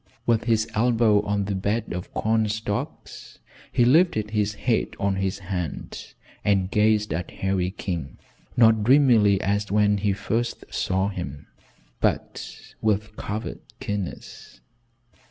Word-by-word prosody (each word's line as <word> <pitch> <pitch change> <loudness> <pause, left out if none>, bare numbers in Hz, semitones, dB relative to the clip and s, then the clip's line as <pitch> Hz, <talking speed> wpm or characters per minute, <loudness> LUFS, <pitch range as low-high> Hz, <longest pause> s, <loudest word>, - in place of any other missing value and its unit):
With 115 -1 +2
his 110 -2 +2
elbow 115 -2 +3
on 100 -1 0
the 100 - -2
bed 105 +4 -1
of 90 +1 -6
corn 110 0 +1
stalks 105 -1 -5 0.3
he 120 - +3
lifted 125 - +3
his 105 -1 0
head 115 +2 0
on 100 -1 0
his 95 0 -1
hand 90 -4 -5 0.3
and 95 -2 +1
gazed 105 -2 +2
at 85 +1 -3
Harry 95 -2 -1
King, 85 -8 -5 0.4
not 110 -2 +5
dreamily 115 -6 +5
as 100 +1 -1
when 105 0 +3
he 100 0 +1
first 115 +4 -2
saw 95 +1 0
him, 75 -8 -6 0.5
but - - -3
with 110 0 0
covert 105 +1 -5 0.2
keenness. 100 -10 -6
105 Hz, 130 wpm, -24 LUFS, 95-110 Hz, 0.5 s, not